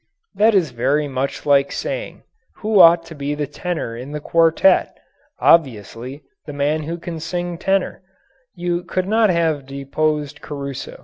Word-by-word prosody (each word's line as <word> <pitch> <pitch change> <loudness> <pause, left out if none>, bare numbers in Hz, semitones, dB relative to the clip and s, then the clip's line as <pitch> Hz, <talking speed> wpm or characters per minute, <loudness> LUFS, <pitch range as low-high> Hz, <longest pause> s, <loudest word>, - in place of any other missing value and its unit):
That 220 +1 +3
is 175 -6 +2
very 135 +5 0
much 135 0 -3
like 140 -1 +4
asking: - - -5 0.3
"Who 215 -1 +1
ought 170 -1 +7
to 165 - -10
be 145 0 -3
the 150 0 -2
tenor 150 -4 -4
in 130 +5 -8
the 150 - -3
quartet?" 165 - +3 0.4
Obviously, 130 - +1 0.2
the 150 - -6
man 145 +2 0
who 165 +3 -4
can 170 -1 -6
sing 175 +2 -3
tenor. 195 0 0 0.5
You 175 -1 -2
could 185 0 -2
not 220 +1 +3
have 160 -6 0
deposed 150 +2 -2
Caruso. 140 -2 -7
155 Hz, 150 wpm, -20 LUFS, 140-175 Hz, 0.5 s, ought